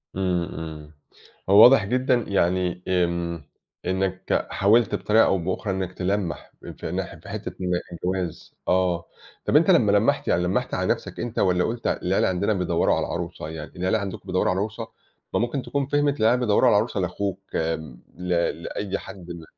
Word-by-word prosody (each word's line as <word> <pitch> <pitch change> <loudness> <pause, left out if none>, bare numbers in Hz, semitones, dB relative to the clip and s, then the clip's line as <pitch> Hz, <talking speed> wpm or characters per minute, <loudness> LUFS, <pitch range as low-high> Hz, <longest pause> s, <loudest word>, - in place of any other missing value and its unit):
إمم، 90 -2 0
إمم. 80 -2 -7 0.6
هو 100 +3 +9
واضح 125 -5 +7
جدًا 130 +4 +1
يعني 90 -1 0
إمم، 85 -3 -1 0.4
إنك 95 0 -1
حاولت 110 +3 +3
بطريقة 110 +1 +4
أو 95 - +2
بأخرى 95 +3 -2
إنك 95 -1 -3
تلمّح 95 -1 -2 0.3
في - - -5
ناح - - -3
في - - -13
حتة - - -5
إن 90 0 -1 0.2
الجواز، 90 -1 -4
آه، 90 -2 +1 0.4
طَب - - 0
أنت 165 +5 +6
لمّا 110 - +4
لمّحت 110 +8 +2
يعني 90 - +2
لمّحت 90 - -1
على - - 0
نفسك - - -10
أنت، 120 -1 -3
والَّا 90 -2 +3
قُلت 115 +3 -2
العيلة 90 +2 +1
عندنا 95 +3 +1
بيدوّروا 90 -3 +1
على - - -1
عروسة، 75 - -5
يعني 80 -1 -7
العيلة 95 +5 +1
عندكم 100 -2 -5
بيدوّروا 95 -1 +1
على 95 - 0
عروسة، 110 +2 -4 0.5
ما - - +2
ممكن 120 +3 -1
تكون 140 0 -2
فهمت 145 -1 +1
العيلة 120 +3 +4
بيدوّروا 125 +1 +3
على 105 - +5
عروسة 105 -1 0
لأخوك 95 +1 -2 0.2
آآ، 80 0 +1 0.4
ل 90 +1 -6 0.4
لأي 100 -1 -3
حد 90 -3 -10
م 85 -1 -8
95 Hz, 175 wpm, -24 LUFS, 90-110 Hz, 0.6 s, هو